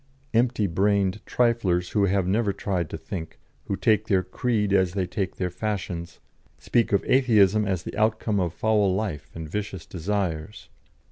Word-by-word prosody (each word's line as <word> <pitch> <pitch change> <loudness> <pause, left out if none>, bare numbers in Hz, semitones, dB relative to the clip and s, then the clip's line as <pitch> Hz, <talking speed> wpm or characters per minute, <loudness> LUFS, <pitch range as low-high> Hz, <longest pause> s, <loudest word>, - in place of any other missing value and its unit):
Empty 115 -2 +2
brained 100 +2 +1
triflers 105 -8 +1
who 105 -2 +2
have 95 -1 +1
never 105 +2 +1
tried 95 -4 -2
to - - -5
think, 80 -4 -7 0.3
who 100 - -2
take 110 0 +2
their 95 -3 +2
creed 105 -4 -1
as 95 -3 +3
they 95 -2 0
take 95 -1 -3
their 90 -2 -2
fashions, 90 -4 -4 0.4
speak 120 -2 +1
of 100 - +2
Atheism 110 -5 +4
as 95 -3 -1
the - - -7
outcome 110 -1 +1
of 90 -3 0
foul 105 0 +2
life 95 -8 -3
and 80 -1 -6
vicious 95 -1 -4
desires. 90 0 -3
100 Hz, 160 wpm, -25 LUFS, 90-110 Hz, 0.4 s, Atheism